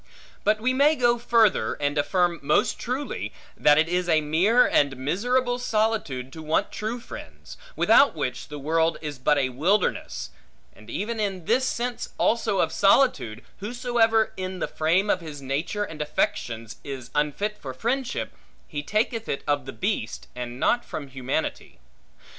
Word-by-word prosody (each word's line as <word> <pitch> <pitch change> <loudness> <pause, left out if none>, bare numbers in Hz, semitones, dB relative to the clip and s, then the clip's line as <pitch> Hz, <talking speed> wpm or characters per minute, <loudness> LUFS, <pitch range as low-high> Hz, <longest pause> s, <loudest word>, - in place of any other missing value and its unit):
But 215 +1 +3
we 255 +3 +1
may 285 +4 +4
go 240 -3 +2
further, 225 - +3
and 145 0 -1
affirm 175 +3 +1
most 145 +2 +2
truly, 260 +4 -3 0.2
that 150 0 +5
it 160 +1 +4
is 180 +1 -1
a 160 -1 +5
mere 180 +11 +4
and 140 -2 +2
miserable 245 - 0
solitude 215 - -1
to 160 - -8
want 155 +1 0
true 220 +3 -3
friends; - - -10 0.2
without 280 -8 +5
which 130 -4 -3
the 150 - -7
world 160 +3 +1
is 150 -4 -6
but 150 +3 +3
a 135 -2 +1
wilderness; 130 - 0 0.4
and 110 - -15
even 220 +3 -3
in 195 -5 -2
this 255 +6 +2
sense 245 0 -3
also 220 -3 +2
of - - +1
solitude, 195 - +3 0.2
whosoever 225 0 +1
in 185 0 -4
the - - -2
frame 170 +6 +1
of 185 - +1
his 155 -3 -8
nature 140 +10 -2
and 160 -6 -6
affections, 115 -6 -2
is 130 -3 -7
unfit 150 +9 0
for 135 - -6
friendship, 245 - -2 0.3
he 145 - -4
taketh 220 +7 -1
it 140 - -2
of 145 -2 0
the - - -4
beast, 190 - -3
and 125 0 -6
not 240 - +2
from 145 -3 -7
humanity. 130 +4 -3
175 Hz, 160 wpm, -25 LUFS, 145-225 Hz, 0.4 s, that